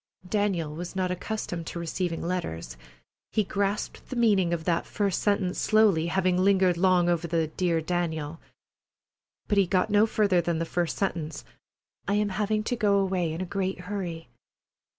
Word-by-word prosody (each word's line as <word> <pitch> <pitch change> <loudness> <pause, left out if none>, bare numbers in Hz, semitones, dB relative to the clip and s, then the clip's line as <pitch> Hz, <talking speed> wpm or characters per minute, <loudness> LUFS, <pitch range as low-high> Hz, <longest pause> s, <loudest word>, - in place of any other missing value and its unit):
Daniel 185 -6 0
was 175 +4 -6
not 185 -1 0
accustomed 180 -3 -4
to - - -5
receiving 170 0 -2
letters. 85 - -3 0.6
He 215 - +2
grasped 200 +1 -2
the 260 - -4
meaning 205 -7 +3
of 170 -2 -1
that 170 0 0
first 200 -3 -1
sentence 200 -3 +1
slowly, 210 -7 +3
having 185 0 +1
lingered 190 -2 +4
long 180 0 +3
over 170 -1 +1
the 165 -2 0
"Dear 170 0 0
Daniel." 160 -2 -2 1.1
But 205 - +3
he 195 - +3
got 185 +1 +1
no 210 +2 +5
further 200 -5 +2
than 170 -1 -1
the 165 - -1
first 175 0 -1
sentence: 165 -5 -3 0.6
"I 200 - +2
am 210 0 +1
having 215 +2 0
to 245 - -1
go 205 -4 +3
away 185 -4 0
in 165 +3 -4
a - - -2
great 190 -1 -2
hurry." 180 -4 -5
180 Hz, 170 wpm, -27 LUFS, 170-200 Hz, 1.1 s, no